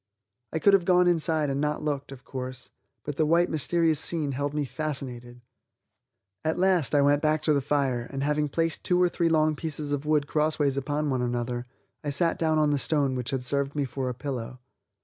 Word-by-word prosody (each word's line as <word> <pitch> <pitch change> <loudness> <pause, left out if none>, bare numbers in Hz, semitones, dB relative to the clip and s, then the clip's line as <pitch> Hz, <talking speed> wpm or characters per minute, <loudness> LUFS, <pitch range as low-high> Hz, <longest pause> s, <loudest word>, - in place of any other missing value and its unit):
I - - -1
could 200 +5 +4
have 190 -3 +4
gone 180 0 +4
inside 160 -4 +2
and 135 +1 -1
not 150 0 -1
looked, 145 -2 -3
of 130 -2 -11
course, 130 -1 -7 0.3
but 145 -2 -5
the 155 - +3
white, 170 +2 +3
mysterious 160 0 +2
scene 155 -4 0
held 140 +2 -2
me 150 -1 -1
fascinated. 125 -5 -5 1.0
At 160 0 0
last 180 -6 +2
I 145 - +5
went 145 +1 +3
back 155 0 +1
to 155 - +3
the 140 - +2
fire 135 -4 0
and 135 0 -3
having 150 0 0
placed 165 +2 -1
two 180 -1 +2
or 180 -1 +4
three 170 -1 0
long 155 -1 +3
pieces 150 -2 -4
of 145 +1 -2
wood 150 -2 +2
crossways 150 -2 +1
upon 145 +2 -1
one 130 -1 0
another, 120 0 -2 0.4
I 145 - -2
sat 165 +4 +1
down 160 -1 +2
on 150 -1 +3
the 145 - +1
stone 140 -1 +1
which 125 -2 -3
had 130 -2 -2
served 140 +2 -1
me 145 -2 0
for 130 0 -3
a 125 - -4
pillow. 125 -2 -5
145 Hz, 210 wpm, -27 LUFS, 135-155 Hz, 1.0 s, I